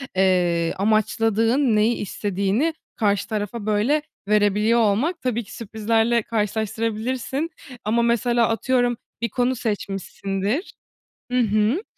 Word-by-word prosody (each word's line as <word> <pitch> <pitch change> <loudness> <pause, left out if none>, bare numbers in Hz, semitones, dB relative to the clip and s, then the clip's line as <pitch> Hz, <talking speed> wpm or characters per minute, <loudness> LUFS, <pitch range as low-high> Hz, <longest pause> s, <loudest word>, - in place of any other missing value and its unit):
eee, 180 -3 +2
amaçladığın, 225 +4 +2
neyi 215 +3 +3
istediğini 205 - -1 0.2
karşı 205 -3 +1
tarafa, 215 0 -3
böyle, 215 +9 +2 0.3
verebiliyor 210 +2 +3
olmak. 235 - +1
Tabii 240 -2 -1
ki, 215 - -12
sürprizlerle 225 +1 +1
karşılaştırabilirsin. 225 +6 -2 0.4
Ama, 230 +3 +2
mesela, 235 0 +2
atıyorum, 245 +1 +1 0.2
bir 235 - 0
konu 250 +4 0
seçmişsindir. 200 - -3 0.6
Hı 250 - +2
hı. 215 - +2
225 Hz, 105 wpm, -23 LUFS, 205-240 Hz, 0.6 s, neyi